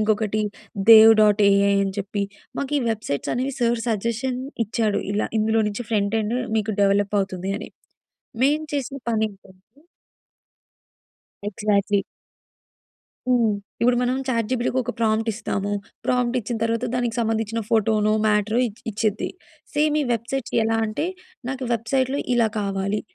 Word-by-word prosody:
ఇంకొకటి 215 0 +1 0.5
'dev 225 0 +10
dot 210 0 +4
AI' 200 0 +4
అని 195 - -2
చెప్పి. 200 +1 -2 0.4
మాకు 280 +1 -3
ఈ - - -1
వెబ్సైట్స్ 215 -10 -2
అనేవి 260 +2 -2
సార్ 235 0 +2
సజెషన్ 235 +4 -1 0.3
ఇచ్చాడు. 215 -1 0
ఇలా 210 - 0
ఇందులో 220 +1 +2
నుంచి 210 +4 -5
ఫ్రంట్ 205 -1 +1
ఎండ్ 220 +3 -1 0.2
మీకు 215 0 -1
డెవలప్ 200 +1 +2
అవుతుంది 190 0 -3
అని. - - -8 0.7
మేం 295 +3 +3
చేసిన 275 0 -3
పనేంటంటే 200 -4 -3 1.9
ఎగ్జా‌ట్‌లీ. 205 -1 +1 1.3
హ్మ్. 235 -4 +3 0.3
ఇప్పుడు 245 +1 +3
మనం 250 +1 +1
చాట్ 230 -4 0
జీపీటీకి 250 0 0
ఒక 245 - -3
ప్రాంప్ట్ 225 0 +1
ఇస్తాము. 205 -2 -3 0.4
ప్రాంప్ట్ 250 0 +1
ఇచ్చిన 230 +2 -4
తర్వాత 230 0 0
దానికి 245 -2 -1
సంబంధించిన 225 0 -1
ఫోటోనో, 215 -1 +2
మ్యాటరో 210 +2 +2
ఇచ్ 220 -2 -9
ఇచ్చిద్ది. 215 0 -1 0.5
సేమ్ 300 0 +2
ఈ - - +1
వెబ్‌సైట్స్ 235 +2 -3
ఎలా 225 0 +1
అంటే 220 +10 -2 0.4
"నాకు 265 0 -3
వెబ్‌సై‌ట్‌లో 260 +4 0 0.2
ఇలా 230 -2 +3
కావాలి, 200 0 -1
220 Hz, 135 wpm, -23 LUFS, 205-240 Hz, 1.9 s, dev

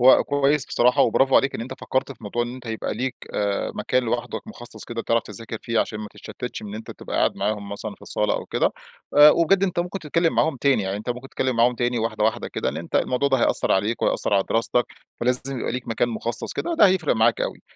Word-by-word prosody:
هو 130 +2 +7
كويس 145 0 +1
بصراحة، 125 +1 +3
وبرافو 135 +3 +3
عليك 135 - +2
إن - - -4
أنت 120 - -6
فكرت 130 +1 -1
في - - -20
موضوع 120 +4 -1
إن 120 +1 -5
أنت 125 -2 -11
يبقى 110 -2 -3
ليك 125 +3 -3 0.2
آآ، 100 -1 -1
مكان 130 0 0
لوحدك 120 - -3
مخصص 120 - -10
كده 115 -1 -5
تعرف 115 -1 +1
تذاكر 110 +2 -7
فيه 115 -1 -1
عشان 105 - -3
ما 105 -1 -6
تتشتتش، - - -7
إن 105 0 -7
أنت 110 - -8
تبقى - - -6
قاعد - - +2
معاهم 105 -1 -2
مثلًا 100 - -5
في - - -23
الصالة - - 0
أو - - -4
كده. - - +1 0.5
آآ، 150 +1 +10
وبجد 180 +5 +3
أنت 185 -3 0
ممكن 180 +3 -2
تتكلم 165 +1 0
معاهم 160 -3 +2
تاني، 135 -4 +2
يعني 95 +1 -2
أنت 110 +4 -4
ممكن 125 +2 -6
تتكلم 130 -2 -1
معاهم 120 +1 +4
تاني 120 0 0
واحدة 110 -1 -1
واحدة 110 - 0
كده - - -2
إن - - -3
أنت - - -3
الموضوع 130 +3 +1
ده 135 - +3
هيأثر - - +2
عليك 105 +4 0
وهيأثر - - +2
على 95 - +3
دراستك، 115 +2 +2 0.4
فلازم 125 +2 -1
يبقى - - -2
ليك 125 -1 -5
مكان 115 +2 +1
مخصص 115 0 -3
كده، 340 - -2
ده 210 - +7
هيفرق 185 -7 +2
معاك 115 0 +3
أوي. - - -3
120 Hz, 235 wpm, -23 LUFS, 110-135 Hz, 0.5 s, آآ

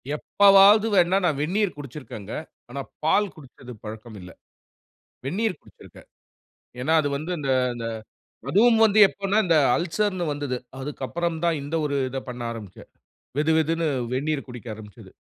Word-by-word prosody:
எப்போவாவது 200 +5 +6
வேண்ணா 180 +1 +4
நான் 150 -5 +1
வெந்நீர் 190 +5 0
குடிச்சிருக்கங்க. 130 -7 -8 0.4
ஆனா, 140 +3 -5 0.2
பால் 200 +5 +2
குடிச்சது 130 -4 -13
பழக்கம் 110 0 -9
இல்ல. 90 0 -11 0.9
வெந்நீர் 190 +7 -1
குடிச்சிருக்கேன். - - -17 0.7
ஏனா, 160 +5 +1
அது 145 - -1
வந்து 160 +5 -5
இந்த 140 -2 -3 0.3
இந்த 115 -1 -5 0.7
அதுவும் 225 +3 +5
வந்து 215 -1 +3
எப்பனா 200 +2 -1
இந்த 165 -2 +4 0.2
அல்சர்னு 185 +2 -1
வந்துது. 145 -3 -3 0.2
அதுக்கப்புறம் 160 +4 -3
தான் 165 -2 +1
இந்த 145 +3 -6
ஒரு 140 -1 -2
இத 135 +1 -4
பண்ண 120 -1 -7
ஆரம்பிச்சேன். 105 -5 -11 0.5
வெது 155 +2 +2
வெதுனு 165 +1 0 0.3
வெந்நீர் 140 +2 -2
குடிக்க 120 -1 -9
ஆரம்பிச்சது. 105 -3 -13
155 Hz, 140 wpm, -24 LUFS, 130-185 Hz, 0.9 s, எப்போவாவது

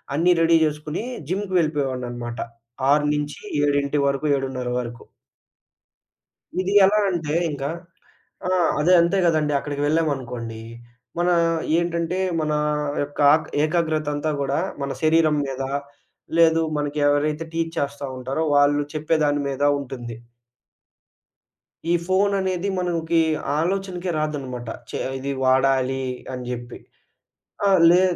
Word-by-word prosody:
అన్ని 175 +3 +4
రెడీ 165 0 +5
జేసుకొని 150 +5 -3 0.3
జిమ్‌కెళ్ళిపోయేవాడినన్నమాట. 140 -11 -1 0.5
6-7 145 -1 0
వరకు 140 +2 -1
7:30 130 -2 -3
వరకు. 120 -1 -6 1.6
ఇది 190 +2 -1
ఎలా 210 +2 +4
అంటే 160 -4 -2 0.2
ఇంక, 140 -1 -5 0.8
ఆహ్, 180 -3 +2
అదే 175 +4 +4
అంతే 170 +4 +2
గదండి 155 -3 +2
అక్కడికెళ్ళామనుకోండి, 140 -6 -2 0.6
మనా 175 0 +3 0.4
ఏంటంటే, 170 +1 -1 0.2
మనా 150 -1 0 0.4
యొక్క 145 0 -7
ఆగ్ 155 0 +2 0.2
ఏకాగ్రతంతా 155 -2 0
గూడా, 140 +3 0 0.2
మన 140 - -2
శరీరం 155 -1 +4
మీద, 135 0 -4 0.8
లేదు 165 0 +5 0.2
మనకి 145 0 -2
ఎవరైతే 150 +2 0
టీచ్ 165 0 -2
చేస్తా 140 0 -2
ఉంటారో, 135 +5 -2
వాళ్ళు 145 0 +4
చెప్పే 155 +1 0
దాని 145 0 +1
మీద 135 +1 -3 0.2
ఉంటుంది. 120 -4 -7 1.7
ఈ - - +4
ఫోననేది 190 -1 +1
మనంకి 170 -2 +1 0.4
ఆలోచనకే 185 +1 -2
రాదనమాట. 135 -6 -3 0.2
చే - - -4 0.2
ఇది 140 +1 -4
వాడాలి 130 0 +2 0.3
అని 125 -1 -5
జెప్పి. 120 0 -6 0.9
ఆ! - - +5 0.2
లే 180 +2 +6
150 Hz, 105 wpm, -23 LUFS, 135-165 Hz, 1.7 s, లే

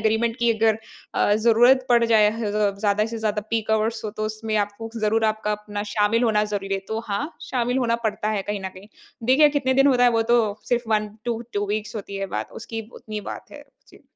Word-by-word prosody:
Agreement 225 +2 +1
कि 235 -1 +3
अगर 220 0 +2 0.4
अ, 205 - +3
ज़रूरत 240 +4 +4
पड़ 235 -1 +5
जाए 220 -2 +5
ह 225 -2 -3
ज़ 205 -1 +1
ज़्यादा 210 0 +2
से 230 0 -5
ज़्यादा 210 -1 -1
पीक 220 -1 -1
आवर्स 220 +1 0
हों 210 - -2
तो, 215 0 -4
उसमें 215 0 -3
आपको 205 +2 -2
ज़रूर 220 +1 +1
आपका 215 -1 0
अपना 205 0 -5
शामिल 215 +3 +2
होना 215 -2 +2
ज़रूरी 195 -2 -3
है। 195 - -2
तो 220 0 -2
हाँ, 200 +7 -1 0.3
शामिल 250 0 0
होना 235 -2 +1
पड़ता 215 0 -1
है 205 -2 -1
कहीं 205 0 -3
न 190 - -4
कहीं। 195 +3 -13 0.4
देखिए, 290 +4 +6
कितने 260 -2 +1
दिन 270 +1 +5
होता 250 -3 +4
है, 245 - +6
वो 225 -1 +2
तो 240 - +6 0.3
सिर्फ़ 240 -1 0
1 215 -1 +2 0.2
टू 235 -1 -2
2 205 0 0
वीक्स 215 +1 -3
होती 200 -1 -6
है 195 - -2
बात, - - -4
उसकी 225 -1 -6
उतनी 215 -1 -5
बात - - -11
है। - - -11 0.2
जी। - - -18
220 Hz, 230 wpm, -23 LUFS, 210-230 Hz, 0.4 s, देखिए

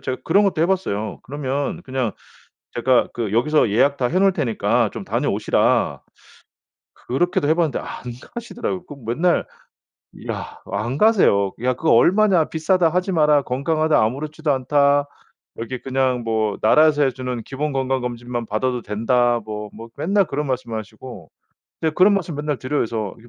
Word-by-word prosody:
제가 130 - -3
그런 195 +5 +4
것도 185 -5 +1
해 170 - +3
봤어요. 110 - -2
"그러면 145 +4 -3
그냥 130 - -2 0.6
제가 125 +1 +3
그 115 -4 -3
여기서 130 0 +3
예약 140 +7 +3
다 125 - +1
해 185 - +1
놓을 195 -1 +4
테니까 115 - 0
좀 - - -7
다녀오시라." - - +1 0.9
그렇게도 175 +4 -1
해 160 - +4
봤는데 165 -5 0
안 - - -10 0.5
가시더라고요. 230 -6 -5
그 145 - -9
맨날 165 +10 +1 0.7
이야 - - -7
안 120 +5 -2
가세요. 145 - +4
"야, 130 0 +2
그거 160 +5 0
얼마냐? 185 - +4
비싸다 165 +2 +2
하지 180 +3 -1
마라. 150 -3 +4
건강하다 155 +3 +1
아무렇지도 150 +6 -2
않다. 140 +2 +2 0.5
여기 120 +2 -5
그냥 130 -2 0
뭐 110 -2 -1
나라에서 150 +5 +4
해 135 - +2
주는 125 -2 -5
기본 145 +5 -3
건강검진만 125 -3 -2
받아도 125 +4 -1
된다." 120 +3 +1
뭐, 105 -1 -6
뭐 115 +2 -10
맨날 195 +7 +2
그런 150 +1 -3
말씀을 120 -3 -3
하시고 110 -4 -11 0.5
네 160 - +2
그런 185 +6 +4
말씀 175 -6 -2
맨날 150 -2 -2
드려요, 135 -1 -1
저. 110 -3 -4
135 Hz, 340 characters per minute, -21 LUFS, 120-160 Hz, 0.9 s, 그런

